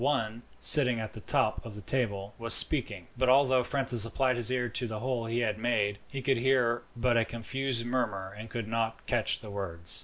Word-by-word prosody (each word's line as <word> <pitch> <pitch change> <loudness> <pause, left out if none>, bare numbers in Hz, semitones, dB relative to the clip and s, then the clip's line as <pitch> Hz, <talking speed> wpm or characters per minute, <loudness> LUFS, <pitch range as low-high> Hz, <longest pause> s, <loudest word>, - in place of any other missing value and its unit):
One, 120 -5 -2 0.2
sitting 125 -7 +6
at 110 -1 -7
the - - -9
top - - -2
of 115 -3 -11
the 105 - -10
table, 100 -4 -4
was 115 0 +9
speaking; 105 - +5
but 130 +1 -1
although 130 -1 +3
Francis 130 -2 -1
applied 130 +2 -1
his 120 -1 +1
ear 125 -1 -2
to 120 +1 0
the 110 -1 -6
hole 120 0 -4
he 115 +1 -3
had 110 -2 -3
made, 105 -4 -2
he 135 -1 -7
could 135 -1 0
hear 120 -2 0 0.2
but 120 0 0
a 115 - +2
confused 115 +2 -4
murmur, 105 -6 -4
and 110 +2 -11
could 115 -1 -6
not 115 0 -4
catch 120 -4 -1
the 105 - -11
words. 85 -4 -2
115 Hz, 210 wpm, -27 LUFS, 110-130 Hz, 0.2 s, was